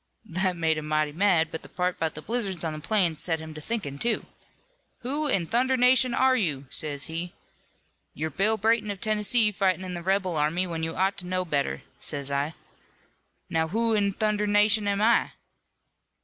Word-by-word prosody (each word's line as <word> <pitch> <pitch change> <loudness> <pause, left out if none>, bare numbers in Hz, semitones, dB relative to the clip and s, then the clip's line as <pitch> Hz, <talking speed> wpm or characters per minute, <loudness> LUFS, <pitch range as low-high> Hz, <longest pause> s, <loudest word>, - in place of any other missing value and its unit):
"That 185 -1 +1
made 160 -2 +1
him 150 - -7
mighty 155 -1 0
mad, 170 -1 +2
but 160 - -5
the - - -10
part 180 0 -2
'bout 160 -1 -2
the 155 - -8
blizzards 200 -8 -2
on 160 -2 -2
the 155 - -6
plains 175 -2 0
set 165 -2 +1
him 160 0 -9
to 155 - -9
thinkin', 150 -9 -4
too. 235 -2 -1 0.8
'Who 285 +5 -2
in 195 -11 0
thunderation 250 +3 +3
are 260 0 +4
you?' 155 - -1
sez 145 -2 0
he. 170 +2 -4 0.8
'You're 160 +1 -3
Bill 215 +8 +2
Brayton, 220 0 +1
of 200 -2 -4
Tennessee, 215 +1 +4
fightin' 190 -2 0
in 180 - -5
the 175 - -5
rebel 185 -2 0
army, 155 +5 +1
when 165 -2 -4
you 165 0 -3
ought 190 +2 0
to 180 - -9
know 185 0 -1
better,' 140 - -2 0.2
says 140 -1 -1
I. 140 +3 -1 0.9
'Now, 160 0 0
who 225 +6 0
in 200 -2 +1
thunderation 210 0 +2
am 200 +1 0
I?' 230 +1 +3
185 Hz, 185 wpm, -26 LUFS, 160-215 Hz, 0.9 s, are